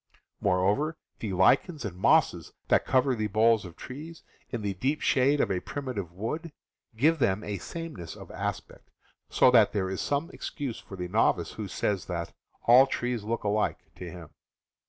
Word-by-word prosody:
Moreover, 105 - +1 0.2
the 105 -4 -3
lichens 135 - +3
and 95 -4 -5
mosses 90 - +2 0.2
that - - +3
cover 130 0 +3
the 110 -3 -1
boles 110 +1 +3
of 85 -2 -10
trees, 155 +5 -9 0.3
in 115 -4 -4
the 100 -1 -1
deep 135 +10 -1
shade 140 +2 +3
of 105 - +1
a 90 - 0
primitive 120 - -5
wood, 130 - -4 0.5
give 160 +6 +3
them 100 -4 +1
a 100 -2 -4
sameness 160 - -7
of - - -11
aspect, - - -5 0.4
so 125 - +5
that 115 -4 +5
there 95 -3 -1
is 95 - -3
some 145 +5 -1
excuse 140 - -5
for 95 - -10
the 90 -1 -4
novice 90 -4 +2
who 105 -2 -6
says 95 -2 -1
that 85 -2 -4 0.3
"all 125 +3 +8
trees 120 -4 -2
look 115 +2 -2
alike 105 +1 +1
" - - -39
to 90 - -7
him. 80 -3 -10
110 Hz, 175 wpm, -28 LUFS, 95-135 Hz, 0.5 s, all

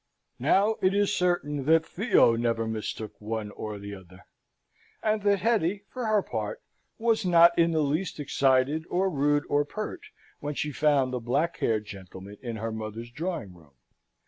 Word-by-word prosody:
Now 210 +3 +3
it 185 +1 +3
is 205 0 +2
certain 150 -6 0
that 160 +1 +4
Theo 180 - +3
never 115 -1 0
mistook 110 -1 -5
one 110 -1 -4
or 105 0 -6
t'other; 100 -1 -11 0.8
and 215 -1 +1
that 200 -1 +2
Hetty, 205 -4 +1
for 250 -3 -4
her 215 -2 +3
part, - - -4 0.3
was 225 -1 +1
not 170 -1 +6
in 170 0 +4
the 160 -2 +1
least 155 +4 -1
excited, 140 +2 +2
or 190 +2 +1
rude, 145 0 +2
or 145 0 +2
pert, 215 +9 -6 0.4
when 145 0 -4
she 150 - -2
found 140 -2 +2
the 125 - -1
black 140 +9 0
haired 110 -2 0
gentleman 95 0 -10
in 120 -3 -5
her 110 +1 -3
mother's 110 +2 -6
drawing 160 - -4
room. 80 -5 -20
145 Hz, 165 wpm, -27 LUFS, 110-180 Hz, 0.8 s, not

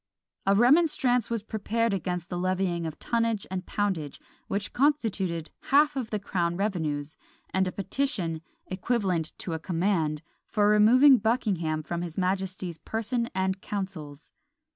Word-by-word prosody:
A 195 - +5
remonstrance 250 -1 +4
was 230 -3 -2
prepared 220 +1 -1
against 180 -2 -3
the 175 - -3
levying 180 -2 0
of 155 - -7
tonnage 230 -3 0
and 185 -1 -4
poundage, 185 -8 -2 0.3
which 200 0 -2
constituted 210 - 0
half 295 +1 +4
of 255 -5 -3
the 215 - -1
crown 175 -4 -1
revenues; 155 -7 -2 0.4
and 190 0 +2
a - - -2
petition, 195 - -2 0.2
"equivalent 185 -5 -1
to 170 - -4
a 160 - -2
command," 165 -3 0 0.2
for 205 -1 +2
removing 245 +6 +7
Buckingham 190 -9 0
from 170 +2 -3
his 170 -2 -6
majesty's 185 -2 -2
person 235 +2 -2
and 190 0 0
councils. 170 -9 -6
190 Hz, 140 wpm, -27 LUFS, 170-225 Hz, 0.4 s, removing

